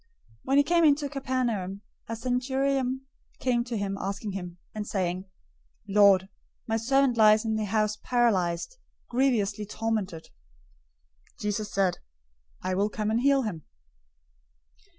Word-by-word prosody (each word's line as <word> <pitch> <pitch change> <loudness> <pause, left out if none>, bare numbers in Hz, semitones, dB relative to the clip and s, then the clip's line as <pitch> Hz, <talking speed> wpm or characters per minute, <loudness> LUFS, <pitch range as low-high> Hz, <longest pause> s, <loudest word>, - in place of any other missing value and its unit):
008:005 460 - -40 0.4
When 270 +1 +2
he 285 - +7
came 335 +3 +3
into 290 -1 +4
Capernaum, 240 -8 -2 0.3
a 230 - -2
centurion 260 +2 0 0.4
came 245 -2 +1
to 240 -2 -3
him, 195 -1 -3
asking 200 +2 -3
him, 180 -2 -6
008:006 - - -49
and 210 -1 -5
saying, 185 -1 -2 0.6
"Lord, 200 -2 +5 0.4
my 225 - 0
servant 265 +2 +2
lies 215 0 +6
in 220 - 0
the 215 -1 -1
house 215 +1 0
paralyzed, 215 - 0 0.3
grievously 220 -5 +1
tormented." 210 -6 -3 1.1
008:007 - - -31
Jesus 210 0 -2
said 190 -2 +2
to - - -12
him, - - -34 0.6
"I 185 0 -1
will 200 +3 +1
come 215 0 -2
and 230 +2 +1
heal 275 0 +4
him." 175 -9 -4
220 Hz, 150 wpm, -27 LUFS, 195-255 Hz, 1.1 s, he